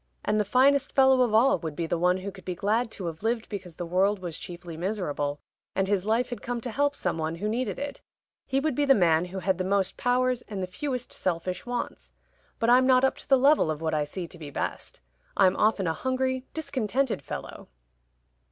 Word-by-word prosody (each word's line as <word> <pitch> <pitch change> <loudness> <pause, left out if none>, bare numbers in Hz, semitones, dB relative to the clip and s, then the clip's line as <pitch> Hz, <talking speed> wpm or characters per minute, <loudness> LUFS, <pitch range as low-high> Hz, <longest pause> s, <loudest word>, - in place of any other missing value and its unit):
And 215 +1 +2
the - - +3
finest 275 +5 +3
fellow 265 -1 +5
of 245 -3 +3
all 265 +6 +4
would 160 -3 -5
be 170 - -2
the 165 - -1
one 180 +2 +2
who 195 +2 -5
could 190 -1 -14
be 180 0 -4
glad 220 +6 +1
to 195 -4 -6
have 165 -1 -5
lived 225 +1 -1
because 190 -5 -7
the 175 - -5
world 190 +4 +2
was 175 -4 -6
chiefly 175 -2 -8
miserable, 155 -6 -2 0.4
and 190 0 +1
his 200 0 0
life 235 +3 +1
had 245 - -5
come 245 0 -3
to 245 - -4
help 285 +3 +1
some 165 - -2
one 160 +1 -2
who 200 +5 -3
needed 240 +4 -1
it. 285 0 -5 0.5
He 270 0 +1
would 305 +1 0
be 290 - +1
the 270 -1 +6
man 170 -3 +3
who 180 +2 -7
had 190 -1 0
the - - +1
most 190 0 0
powers 250 0 +1
and 200 -3 -4
the - - 0
fewest 250 +6 -4
selfish 180 +3 -3
wants. 245 0 -4 0.4
But 230 +1 +2
I'm 255 +1 +6
not 255 0 +5
up 265 - +3
to - - -12
the 270 - +7
level 275 - +4
of 155 -1 -2
what 160 -1 -2
I 150 -1 +1
see 175 +4 -5
to 170 +1 -12
be 150 -2 -7
best. 135 - -5 0.4
I'm 190 -1 +5
often 210 -3 +2
a 165 - +1
hungry 260 +6 -1
discontented 270 - -1
fellow." - - -7
205 Hz, 225 wpm, -27 LUFS, 175-255 Hz, 0.5 s, the